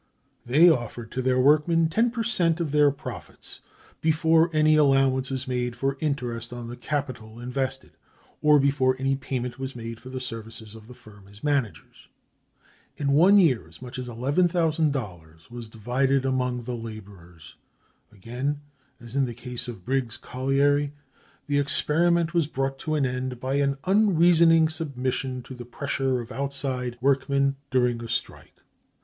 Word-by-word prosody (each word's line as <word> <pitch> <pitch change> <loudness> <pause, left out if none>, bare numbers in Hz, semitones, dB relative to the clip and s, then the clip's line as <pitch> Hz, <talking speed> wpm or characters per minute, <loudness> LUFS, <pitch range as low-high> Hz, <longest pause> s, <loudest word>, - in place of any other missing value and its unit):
They 150 +8 +6
offered 120 -6 0
to 130 - -2
their 130 0 +1
workmen 155 +4 +4
ten 225 +9 +2
per 230 -1 -3
cent 180 -7 +1
of 165 -4 -2
their 150 0 +5
profits, 140 -2 -8 0.4
before 160 +1 +3
any 155 0 +4
allowance 135 -3 +3
was 130 -1 -4
made 125 -1 -2
for 135 +2 -1
interest 125 -6 -3
on 120 -1 -7
the 120 - -6
capital 125 -6 -5
invested, 130 +2 -4 0.5
or 150 0 +6
before 135 -2 +2
any 135 +1 0
payment 130 -2 -4
was 135 0 -5
made 115 -1 -7
for 130 - -11
the 130 0 -5
services 115 -3 -8
of 110 -1 -13
the 125 - -12
firm 100 -4 -17
as 100 +1 -17
managers. 125 - -2 0.9
In 140 -1 0
one 180 +8 +6
year 130 - +3
as 80 - -15
much 125 0 -8
as 125 -1 -6
$11,000 135 - -1
was 120 -2 -8
divided 130 +5 0
among 125 -2 -1
the 125 +2 -5
laborers. 100 -8 -11 0.6
Again, 125 +8 -4 0.4
as 120 +1 -10
in 140 -1 +2
the 120 -2 -6
case 125 +1 -6
of 120 - -5
the 95 - -18
Briggs 125 +1 -2
colliery, 140 +2 0 0.5
the 145 -1 +1
experiment 170 +4 +2
was 170 -4 +2
brought 135 -2 -3
to 155 +2 -2
an 145 -3 +1
end 125 -1 -3
by 130 +2 -1
an 140 -1 +1
unreasoning 170 -5 +5
submission 130 -5 -3
to 130 - -10
the 125 -1 -8
pressure 130 +1 -2
of 120 +1 -10
outside 135 -3 -3
workmen 140 +1 +2
during 125 -2 +1
a - - -6
strike. - - -5
130 Hz, 160 wpm, -25 LUFS, 120-145 Hz, 0.9 s, They